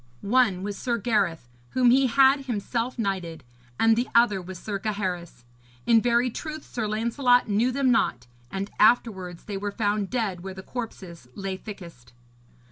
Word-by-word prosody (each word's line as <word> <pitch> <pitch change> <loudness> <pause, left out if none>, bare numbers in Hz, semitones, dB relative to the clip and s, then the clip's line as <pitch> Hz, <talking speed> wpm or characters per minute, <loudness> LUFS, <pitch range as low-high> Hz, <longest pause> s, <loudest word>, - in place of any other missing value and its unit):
One 200 -4 +2
was 205 0 -4
Sir 240 -2 -1
Gareth, 200 - 0 0.3
whom 250 -2 +4
he 265 +1 +4
had 270 +2 +4
himself 240 +1 -2
knighted, 190 -7 -3 0.4
and 225 0 +5
the 240 +2 -1
other 235 -5 +4
was 185 +1 -8
Sir 200 +2 -4
Gaheris. 185 - -4 0.4
In 230 -1 +5
very 240 +1 +2
truth 310 +4 -6
Sir 225 -3 -3
Lancelot 235 +4 +2
knew 220 +5 +2
them 260 0 +2
not; 125 - +1 0.2
and 195 +5 -4
afterwards 190 -6 +2
they 205 -2 -5
were 205 +1 -3
found 205 -2 -1
dead 215 -8 -2
where 190 +1 -7
the 190 - -9
corpses 190 - -7
lay 195 -1 -4
thickest. 170 - -11
215 Hz, 160 wpm, -25 LUFS, 190-240 Hz, 0.4 s, and